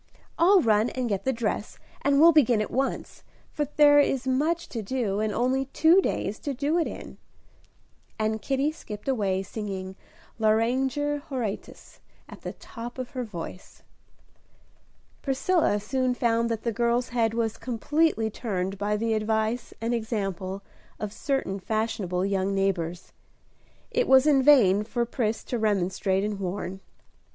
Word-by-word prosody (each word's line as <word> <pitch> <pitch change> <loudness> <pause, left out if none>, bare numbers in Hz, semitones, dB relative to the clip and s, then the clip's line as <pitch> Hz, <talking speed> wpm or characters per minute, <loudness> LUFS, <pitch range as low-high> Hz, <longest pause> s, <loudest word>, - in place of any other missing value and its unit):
I'll 370 +3 +6
run 220 0 +3
and 255 -1 -3
get 200 -4 -2
the 265 - +2
dress, 225 -3 -3 0.2
and 280 0 +3
we'll 330 +2 +8
begin 255 -8 +4
at 215 - -2
once, 270 +2 -2 0.3
for 295 - -1
there 290 -1 +7
is 270 -2 +1
much 300 +6 0
to 230 - -4
do, 210 -2 -2
and 215 0 0
only 255 +5 +1
two 325 +7 +4
days 215 - -2
to 285 -2 -4
do 295 +6 +1
it 330 - +1
in." - - -9 1.0
And 220 0 -1
Kitty 275 +5 0
skipped 210 -8 -9
away, 200 -7 0
singing 190 -2 -6 0.4
"Lauriger 260 +7 +1
Horatius," 235 -7 -5 0.3
at - - -12
the - - -6
top 240 +1 -9
of 255 -1 -5
her 255 -3 -3
voice. 180 -3 -9 1.4
Priscilla 275 - +1
soon 255 +4 -1
found 230 -1 +1
that 225 -1 -3
the 235 - -1
girl's 235 +2 +1
head 230 -2 0
was 225 -1 -1
completely 250 -1 0
turned 195 -4 -3
by 210 +1 0
the 225 +1 0
advice 220 +2 -1
and 230 +2 -1
example 195 -4 -3 0.4
of 210 -1 -4
certain 270 -7 -2
fashionable 195 -4 -1
young 195 0 0
neighbors. 180 -3 -2 0.8
It - - +1
was 265 +1 +6
in 285 -3 +5
vain 225 -8 +5
for 235 +2 -1
Pris 230 -2 -2
to 240 - -3
remonstrate 195 -2 0
and 210 -1 -3
warn. 190 0 -4
230 Hz, 150 wpm, -26 LUFS, 205-265 Hz, 1.4 s, we'll